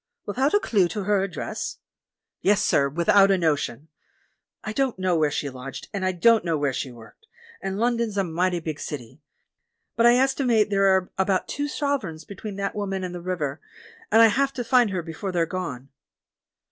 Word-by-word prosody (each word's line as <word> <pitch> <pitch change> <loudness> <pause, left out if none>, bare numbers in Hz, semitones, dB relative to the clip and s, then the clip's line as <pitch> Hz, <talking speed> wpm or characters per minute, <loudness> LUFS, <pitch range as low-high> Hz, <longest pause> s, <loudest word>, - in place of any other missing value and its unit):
"Without 265 - +1
a - - +5
clue 200 - +2
to 195 +4 -4
her 205 0 +2
address?" 190 -3 -4 0.6
*'Yes, 205 +1 +3
sir^ 140 -1 +2
without 195 +5 +4
a 195 - +4
notion. 155 -4 -1 0.8
I 215 - -4
don't 265 -2 0
know 185 -2 +1
where 155 -2 +2
she 145 0 -2
lodged, 130 0 -8
and 200 -2 -3
I 185 - +2
don't 220 +5 +4
know 165 -2 0
where 145 -2 0
she 130 - -4
worked, 120 - -16 0.3
and 195 0 -3
London's 235 -2 0
a 195 - +2
mighty 175 +1 0
big 160 -2 -5
city; 130 0 -7 0.7
but 230 +1 +5
I 240 - +6
estimate 250 -5 +2
there 195 0 +3
are 190 -1 +2
about 190 -1 +1
two 290 0 -2
sovereigns 275 - -2
between 205 0 -7
that 200 0 -3
woman 195 -2 -3
and 180 -1 -4
the 175 - -6
river, 160 -5 -3 0.5
and 225 +1 +7
I 225 - +7
have 275 +5 +1
to 245 - -3
find 245 -1 +4
her 185 -3 -3
before 165 +4 -5
they're 170 -2 +1
gone." 140 -8 -5
190 Hz, 190 wpm, -24 LUFS, 165-220 Hz, 0.8 s, and